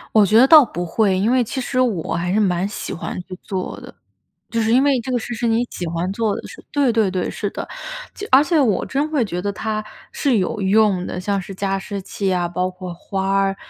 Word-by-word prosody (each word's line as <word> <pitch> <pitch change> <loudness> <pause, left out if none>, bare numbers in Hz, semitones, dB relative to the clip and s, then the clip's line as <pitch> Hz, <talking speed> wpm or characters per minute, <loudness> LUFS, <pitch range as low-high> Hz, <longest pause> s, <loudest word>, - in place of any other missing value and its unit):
我 215 - +7
觉 215 +3 +4
得 260 +3 +7
倒 310 -1 +9
不 175 -7 -4
会。 195 +2 +1
因 210 +6 +2
为 255 -1 +3
其 260 +4 -4
实 255 0 -2
我 210 -10 0
还 175 +1 -1
是 210 - +2
蛮 185 -2 +1
喜 205 - -5
欢 170 - -5
去 185 0 -9
做 185 -2 -4
的， - - -11 0.6
就 230 -1 0
是 220 +1 +1
因 260 +3 +5
为 275 -3 +3
这 255 +3 -5
个 245 - +2
事 240 - -5
是 235 +1 -1
你 230 +2 +2
喜 175 - -4
欢 170 +3 -2
做 215 -1 0
的 - - -9
事 - - -12
对， 280 -5 +2
对， 220 -4 +2
对， 185 -1 -1
是 205 - -3
的。 - - -6 0.5
就 410 - -6
而 265 +2 +7
且 320 0 +2
我 220 -9 +2
真 290 +3 -1
会 285 -7 +1
觉 180 -3 -4
得 200 +2 -1
它 215 +1 -3 0.3
是 265 -6 +1
有 200 +3 -1
用 195 -2 +3
的， 180 - -4
像 200 +1 -1
是 195 - -8
加 195 0 -1
湿 200 0 -5
器 195 0 -2
啊， 175 -1 0
包 180 +1 -1
括 185 -1 -8
花 190 +2 -3
儿， 195 0 +1
205 Hz, 265 characters per minute, -20 LUFS, 185-240 Hz, 0.6 s, 倒